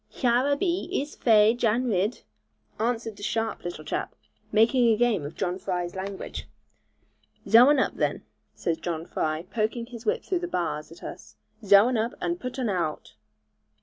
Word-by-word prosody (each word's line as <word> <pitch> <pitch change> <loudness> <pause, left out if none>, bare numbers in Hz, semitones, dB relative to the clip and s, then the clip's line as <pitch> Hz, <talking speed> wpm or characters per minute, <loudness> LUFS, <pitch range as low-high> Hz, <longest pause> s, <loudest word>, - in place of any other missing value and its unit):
'Hyur 250 +2 +1
a - - 0
be, 350 +2 -1
ees 295 -5 -2
fai, 220 -2 +5
Jan 240 0 +1
Ridd,' 210 0 0 0.6
answered 225 -2 -2
a - - -11
sharp 225 +2 -2
little 175 -3 -6
chap, - - -3 0.4
making 225 +1 +4
game 230 -8 +2
of 145 +3 -7
John 185 -1 -2
Fry's 180 -2 -3
language. 190 +1 -6 1.0
'Zhow 240 +4 +8
un 295 - +5
up, 260 - +1
then,' - - -1 0.3
says 165 -1 -2
John 165 -1 -4
Fry 155 -1 -2
poking 220 +4 -2
his 235 -2 -10
whip 460 +2 0
through 365 - -1
the 350 - -4
bars 165 - -3
at 165 - -14
us; - - -9 0.3
'Zhow 200 +2 +7
un 250 -2 +1
up, 230 +5 -1
and 345 0 -2
putt 250 +1 -6
un 260 - -1
aowt.' 170 - -2
220 Hz, 175 wpm, -26 LUFS, 180-245 Hz, 1.0 s, Zhow